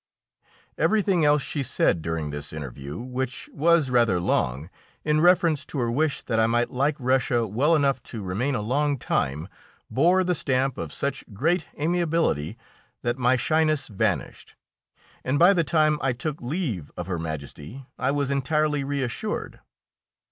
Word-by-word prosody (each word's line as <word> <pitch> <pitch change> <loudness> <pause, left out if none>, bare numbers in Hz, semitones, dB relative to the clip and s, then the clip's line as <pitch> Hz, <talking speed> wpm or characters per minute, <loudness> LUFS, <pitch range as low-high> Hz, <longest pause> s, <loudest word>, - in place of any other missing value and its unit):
Everything 200 -6 +2
else 145 -1 +4
she 145 - -3
said 85 -9 +1
during 80 -2 -3
this 75 0 -5
interview, 70 0 -7
which 125 +2 -5
was 160 -2 +3
rather 115 -7 +3
long, 70 -4 0 0.4
in 155 0 +2
reference 170 -4 +4
to 145 - -7
her 120 -3 0
wish 150 +3 0
that 115 - 0
I 110 - +4
might 120 +1 +1
like 140 +4 +1
Russia 125 -2 +1
well 130 +11 +2
enough 140 -4 +1
to 110 -4 -7
remain 115 +10 -1
a 105 - -2
long 140 +5 +1
time, 75 - -1 0.4
bore 175 +7 +4
the 180 0 +1
stamp 135 -4 0
of - - -5
such 140 0 -2
great 160 - +1
amiability 160 - 0 0.5
that 120 +1 -1
my 125 +1 +3
shyness 155 +3 +1
vanished, 100 - -2 0.7
and 130 +3 0
by 175 +5 +7
the 170 -3 +2
time 155 -1 +2
I 135 -1 +1
took 150 +4 -4
leave 120 - -3
of 90 - -4
Her 90 -2 -3
Majesty 80 - -7
I 130 - +1
was 140 -1 0
entirely 150 +1 +1
reassured. 140 - -3
135 Hz, 155 wpm, -25 LUFS, 110-155 Hz, 0.7 s, by